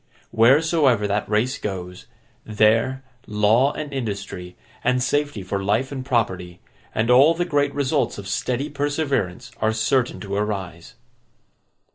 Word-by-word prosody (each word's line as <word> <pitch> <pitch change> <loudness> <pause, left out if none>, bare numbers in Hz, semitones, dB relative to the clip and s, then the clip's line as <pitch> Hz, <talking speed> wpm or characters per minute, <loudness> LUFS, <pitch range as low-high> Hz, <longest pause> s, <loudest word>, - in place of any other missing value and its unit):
Wheresoever 135 -1 +4
that 100 0 -1
race 115 +6 0
goes, 90 -3 -6 0.4
there, 115 +5 +2 0.2
law, 110 +6 +3
and 150 -2 -6
industry, 100 -7 -5 0.3
and 125 0 +2
safety 145 -6 -1
for 100 +2 -3
life 110 +7 0
and 135 -2 -5
property, 95 -9 -1 0.4
and 115 +2 +1
all 140 +7 +6
the 175 +1 -1
great 145 -4 +1
results 140 -3 0
of 100 -1 -8
steady 125 +7 -1
perseverance, 140 - -2
are 110 0 +2
certain 120 +3 0
to 100 -1 -6
arise. 95 -5 -4
115 Hz, 130 wpm, -22 LUFS, 100-135 Hz, 0.4 s, all